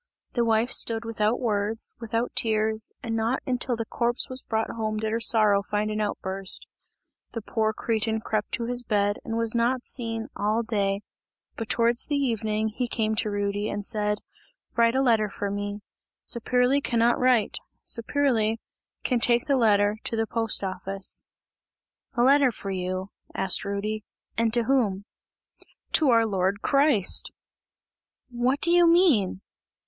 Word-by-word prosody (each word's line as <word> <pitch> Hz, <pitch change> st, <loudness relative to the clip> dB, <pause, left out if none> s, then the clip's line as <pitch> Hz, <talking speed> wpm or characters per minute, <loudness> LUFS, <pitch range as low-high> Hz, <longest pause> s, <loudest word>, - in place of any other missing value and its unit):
The 240 Hz, -, +1 dB
wife 225 Hz, +2 st, +1 dB
stood 225 Hz, 0 st, +2 dB
without 225 Hz, +1 st, 0 dB
words, 215 Hz, -1 st, 0 dB
without 230 Hz, +1 st, -2 dB
tears, 220 Hz, -3 st, +1 dB
and 225 Hz, -1 st, -3 dB
not 225 Hz, +3 st, -1 dB
until 250 Hz, -1 st, -1 dB
the 230 Hz, 0 st, -4 dB
corpse 240 Hz, +4 st, -1 dB
was 255 Hz, 0 st, -3 dB
brought 220 Hz, 0 st, -2 dB
home 215 Hz, -1 st, -3 dB
did 215 Hz, 0 st, -2 dB
her 225 Hz, -, 0 dB
sorrow 215 Hz, -3 st, +4 dB
find 210 Hz, +1 st, -2 dB
an 215 Hz, 0 st, -2 dB
outburst. 195 Hz, -2 st, -1 dB, 0.7 s
The 230 Hz, -, -4 dB
poor 220 Hz, -1 st, 0 dB
cretin 220 Hz, 0 st, -1 dB
crept 215 Hz, -1 st, -3 dB
to 235 Hz, -, -1 dB
his 245 Hz, +1 st, +1 dB
bed 205 Hz, -3 st, 0 dB
and 225 Hz, 0 st, -4 dB
was 230 Hz, -1 st, +1 dB
not 245 Hz, +2 st, 0 dB
seen 225 Hz, -2 st, -3 dB
all 215 Hz, +3 st, 0 dB
day, 200 Hz, -3 st, -1 dB, 0.5 s
but 225 Hz, -2 st, -6 dB
towards 235 Hz, +4 st, +2 dB
evening 220 Hz, -6 st, 0 dB
he 245 Hz, +3 st, -3 dB
came 220 Hz, -2 st, -1 dB
to 215 Hz, -, +1 dB
Rudy, 205 Hz, 0 st, -2 dB
and 205 Hz, 0 st, -4 dB
said: 210 Hz, -1 st, -1 dB, 0.5 s
"Write 230 Hz, 0 st, +3 dB
a 265 Hz, -, +2 dB
letter 225 Hz, -4 st, +2 dB
for 200 Hz, 0 st, -4 dB
me. 205 Hz, +1 st, -4 dB, 0.4 s
Saperli 250 Hz, +3 st, +1 dB
cannot 235 Hz, 0 st, +2 dB
write! 250 Hz, -4 st, +2 dB, 0.3 s
Saperli 230 Hz, -3 st, +1 dB, 0.5 s
can 250 Hz, -3 st, +1 dB
take 235 Hz, 0 st, +2 dB
the 280 Hz, -, +2 dB
letter 210 Hz, -3 st, +3 dB
to -, -, 0 dB
the 225 Hz, 0 st, 0 dB
post 225 Hz, -2 st, +1 dB
office." 190 Hz, +1 st, -2 dB, 0.9 s
"A 240 Hz, -, +2 dB
letter 275 Hz, +1 st, +5 dB
for 200 Hz, -4 st, -6 dB
you," 185 Hz, +1 st, -4 dB, 0.2 s
asked 190 Hz, -1 st, +2 dB
Rudy, 205 Hz, +2 st, -3 dB, 0.3 s
"and 230 Hz, 0 st, +1 dB
to 240 Hz, -, +2 dB
whom?" 220 Hz, -7 st, 0 dB, 0.9 s
"To 305 Hz, -4 st, +3 dB
our 230 Hz, -2 st, +4 dB
Lord 195 Hz, -1 st, -1 dB
Christ!" 275 Hz, -9 st, +3 dB, 1.0 s
"What 245 Hz, +3 st, 0 dB
do 340 Hz, -, +3 dB
you 350 Hz, 0 st, +6 dB
mean?" 315 Hz, -, +3 dB
225 Hz, 155 wpm, -25 LUFS, 210-240 Hz, 1.0 s, you